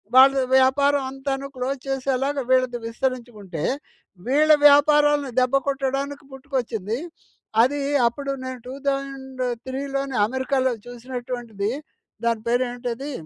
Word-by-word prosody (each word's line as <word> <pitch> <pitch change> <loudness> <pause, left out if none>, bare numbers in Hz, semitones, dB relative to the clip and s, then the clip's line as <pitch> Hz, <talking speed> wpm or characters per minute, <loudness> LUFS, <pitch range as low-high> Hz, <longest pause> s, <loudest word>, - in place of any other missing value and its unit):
వాళ్ళ 270 +1 +7 0.2
వ్యాపారం 280 +2 +3
అంతాను 270 0 -3
క్లోజ్ 260 +2 -2
చేసేలాగా 270 +1 -1
వీళ్ళది 255 -1 +3
విస్తరించుకుంటే. 230 - -4 0.6
వీళ్ళ 300 +4 +4 0.2
వ్యాపారాలను 290 -1 +4
దెబ్బ 255 +1 +1
కొట్టడానికి 275 +1 -2
పుట్టుకొచ్చింది. 245 -6 -3 0.6
అది 275 +5 +2 0.3
అప్పుడు 275 +4 -3
నేను 260 -1 -5
2003లోనే 270 0 -3
అమెరికాలో 260 +1 0 0.2
చూసినటువంటిది. 245 -3 -4 0.5
దాని 230 -2 +1
పేరు 245 +2 +3
ఏంటిది 245 +3 -5
265 Hz, 95 wpm, -23 LUFS, 245-275 Hz, 0.6 s, వాళ్ళ